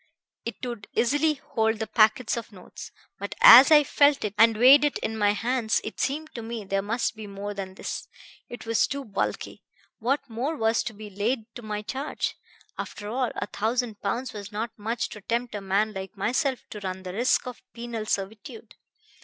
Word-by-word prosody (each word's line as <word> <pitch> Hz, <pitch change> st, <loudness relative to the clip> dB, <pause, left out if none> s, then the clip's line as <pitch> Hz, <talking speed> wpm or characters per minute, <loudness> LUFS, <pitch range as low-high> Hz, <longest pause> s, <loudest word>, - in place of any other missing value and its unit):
It 235 Hz, -2 st, -4 dB
would 235 Hz, -4 st, -6 dB
easily 290 Hz, +6 st, +2 dB
hold 225 Hz, -4 st, -1 dB
the 220 Hz, -, -2 dB
packets 215 Hz, +1 st, +3 dB
of 235 Hz, -1 st, -6 dB
notes. 185 Hz, -3 st, -11 dB, 0.3 s
But 200 Hz, +1 st, -5 dB
as 250 Hz, +4 st, +10 dB
I 300 Hz, -2 st, +7 dB
felt 285 Hz, 0 st, +3 dB
it 205 Hz, -, -2 dB
and 225 Hz, -1 st, +5 dB
weighed 265 Hz, +5 st, +8 dB
it 295 Hz, -, +1 dB
in 220 Hz, -, -3 dB
my 205 Hz, -1 st, +2 dB
hands 230 Hz, +1 st, 0 dB
it 215 Hz, -, -7 dB
seemed 310 Hz, +3 st, -2 dB
to 235 Hz, -, -6 dB
me 225 Hz, -2 st, -6 dB
there 195 Hz, 0 st, 0 dB
must 225 Hz, +3 st, -1 dB
be 215 Hz, -1 st, -8 dB
more 200 Hz, +1 st, -6 dB
than 190 Hz, -2 st, -6 dB
this. -, -, -5 dB, 0.4 s
It 240 Hz, -, -9 dB
was 230 Hz, 0 st, +2 dB
too 275 Hz, 0 st, -5 dB
bulky. 200 Hz, -4 st, -3 dB, 0.4 s
What 270 Hz, +5 st, 0 dB
more 250 Hz, +7 st, -3 dB
was 225 Hz, 0 st, +2 dB
to 240 Hz, -, -4 dB
be 210 Hz, 0 st, -10 dB
laid 225 Hz, +3 st, -2 dB
to -, -, -9 dB
my 210 Hz, -1 st, -4 dB
charge? 270 Hz, +7 st, -3 dB, 0.4 s
After 205 Hz, 0 st, -6 dB
all, 250 Hz, +1 st, 0 dB
a -, -, -2 dB
thousand 225 Hz, 0 st, -2 dB
pounds 235 Hz, +5 st, -2 dB
was 205 Hz, -1 st, -8 dB
not 220 Hz, +2 st, -3 dB
much 225 Hz, +3 st, -2 dB
to 210 Hz, -, -10 dB
tempt 235 Hz, +4 st, -2 dB
a 205 Hz, -, -4 dB
man 200 Hz, +3 st, 0 dB
like 190 Hz, 0 st, -7 dB
myself 255 Hz, +6 st, 0 dB
to 210 Hz, -, -6 dB
run 190 Hz, -1 st, -5 dB
the 180 Hz, -1 st, -6 dB
risk 240 Hz, +6 st, +2 dB
of 250 Hz, -1 st, -8 dB
penal 235 Hz, -2 st, -6 dB
servitude. 210 Hz, -, -4 dB
225 Hz, 195 wpm, -26 LUFS, 205-250 Hz, 0.4 s, as